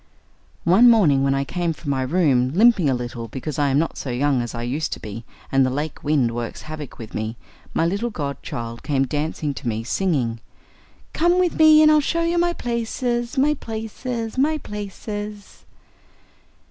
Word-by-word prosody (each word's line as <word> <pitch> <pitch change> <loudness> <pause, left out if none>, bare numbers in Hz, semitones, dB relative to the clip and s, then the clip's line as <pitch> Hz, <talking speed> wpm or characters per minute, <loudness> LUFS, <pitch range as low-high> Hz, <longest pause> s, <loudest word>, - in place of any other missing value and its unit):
One 200 +9 +6
morning 170 -13 +5
when 135 0 +2
I 135 - 0
came 170 +3 -2
from 150 -2 -5
my 135 -1 0
room, 130 -3 +2
limping 205 -7 +5
a 130 - +2
little, 120 -1 -5
because 135 +5 -5
I 145 - +3
am 135 - +2
not 165 +2 -1
so 135 - -5
young 130 +1 +1
as 120 0 -5
I 115 - -4
used 135 +6 -2
to - - -7
be, 110 +2 -8 0.3
and 135 0 +4
the 130 - +2
lake 145 +3 -4
wind 140 -6 +2
works 120 -1 -5
havoc 155 -3 -8
with 115 -2 -9
me, 110 +2 -3 0.4
my 165 - +2
little 200 +7 -1
godchild 130 - -5
came 135 -3 +1
dancing 150 +1 -2
to 135 - -7
me 110 -1 -1
singing: 125 -6 0 0.7
"Come 345 +2 +3
with 360 -3 +1
me 310 0 +8
and 305 - +7
I'll 305 - +6
show 335 +4 0
you 340 +1 +1
my 345 0 +2
places, 240 0 -2
my 290 +3 +4
places, 225 0 -5
my 310 +3 +2
places!" 210 -2 -7
155 Hz, 185 wpm, -22 LUFS, -, 0.7 s, me